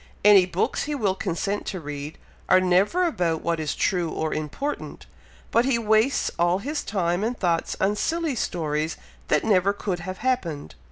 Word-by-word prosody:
Any 200 -3 +7
books 180 +1 -1
he 295 0 -2
will 210 -8 +1
consent 195 +1 -3
to 190 - -3
read, 145 -1 -6 0.3
are 185 - +7
never 185 - +3
about 175 - -1
what 170 -1 0
is 155 -2 -2
true 175 -4 0
or 155 0 -2
important; 215 - -4 0.5
but 235 - +4
he 260 -2 +2
wastes 220 +4 +2
all 175 +1 +3
his 285 +9 -3
time 180 -2 -1
and 240 +2 -1
thoughts 170 -3 0
on 200 +2 +2
silly 325 +6 -1
stories 155 -7 -2 0.3
that 150 - +2
never 200 -2 +3
could 195 -3 -3
have 185 +2 -6
happened. 175 - -2
185 Hz, 170 wpm, -24 LUFS, 170-220 Hz, 0.5 s, Any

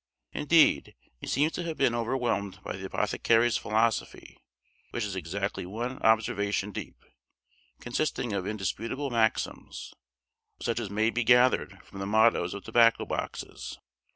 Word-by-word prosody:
Indeed 150 - +3 0.2
he - - -8
seems 150 +4 +2
to 175 - -4
have 165 -2 -4
been 130 -3 +3
overwhelmed 115 -4 -1
by - - -5
the - - -6
apothecary's 115 +1 +2
philosophy, 110 +1 -1 0.5
which 120 - -3
is 100 -2 -4
exactly 95 +3 -3
one 115 +8 -5
observation 105 -2 +1
deep, - - -8 0.7
consisting 120 -2 -2
of 95 -1 -2
indisputable 115 +7 -3
maxims, 115 -2 -1 0.7
such 115 -1 -1
as 110 -4 -4
may 110 +3 +1
be 120 - 0
gathered 125 +2 +3
from 95 - -11
the 95 - -3
mottoes 110 -4 +3
of 100 - -7
tobacco 115 0 +4
boxes. - - -5
115 Hz, 135 wpm, -28 LUFS, 100-120 Hz, 0.7 s, tobacco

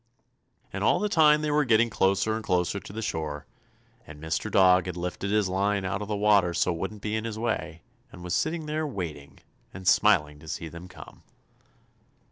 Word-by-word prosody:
And - - -3
all - - +3
the 210 - 0
time 150 -3 +4
they 150 - 0
were 150 0 +3
getting 115 -2 +3
closer 100 +2 +1
and 110 - -5
closer 90 +1 0
to - - -12
the 110 +2 -5
shore, 75 -5 -4 0.6
and 75 0 -11
Mr. 80 +1 -3
Dog 95 -1 +4
had 90 -1 -5
lifted 90 +3 -4
his 105 -1 +2
line 100 +1 0
out 95 +2 -2
of 105 - -5
the 105 - -2
water 100 -4 +3
so 90 - +1
it 85 - -7
wouldn't 100 +3 -5
be 105 0 -2
in 110 - -2
his 115 -1 -5
way, 110 -8 -3 0.3
and 90 - -12
was 90 0 -4
sitting 160 - -1
there 155 +1 -2
waiting, 85 - -7 0.3
and 95 -1 -8
smiling 75 -9 +3
to 80 - -15
see 80 +1 -5
them 85 +3 -10
come. - - -13
100 Hz, 205 wpm, -27 LUFS, 90-110 Hz, 0.6 s, time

